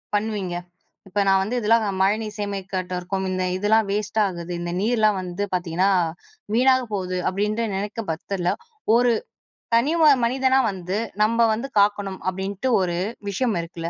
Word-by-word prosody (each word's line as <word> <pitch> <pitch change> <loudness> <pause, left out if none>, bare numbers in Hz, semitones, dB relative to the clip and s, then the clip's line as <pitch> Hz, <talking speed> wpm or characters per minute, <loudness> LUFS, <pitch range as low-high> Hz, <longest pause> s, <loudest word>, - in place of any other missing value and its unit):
பண்வீங்க? 205 -4 -2 0.5
இப்ப 200 +2 0
நா - - +5
வந்து 215 +6 -3
இதல்லாம் 225 0 +3 0.2
மழைநீர் 210 +2 +1
சேமிக்காட்ட 195 -2 -4
இருக்கும். 190 +2 -3
இந்த 185 0 -1
இதெல்லாம் 210 +2 +3
வேஸ்ட்டாகுது, 200 -4 -1
இந்த 175 0 -3
நீர்லாம் 215 -2 +2
வந்து 180 +2 -4
பாத்தீங்கன்னா 180 +1 +1 0.7
வீணாக 260 +1 +4
போகுது 185 -2 -2
அப்டின்ற, 210 +4 -1
நினைக்கும் 205 +1 -4
பட்சத்துல 180 +2 -2 0.4
ஒரு 245 0 +4 0.6
தனி 255 +7 +3
ஒரு 305 -2 +8
மனிதனா 260 +2 +2
வந்து 185 0 -4 0.3
நம்ப 230 +2 +1
வந்து 230 +5 -3
காக்கணும் 200 -1 +1
அப்டின்ட்டு 195 +5 -3
ஒரு 175 -2 -1 0.3
விஷயம் 225 +2 0
இருக்குல்ல! 165 0 -6
200 Hz, 140 wpm, -23 LUFS, 185-220 Hz, 0.7 s, ஒரு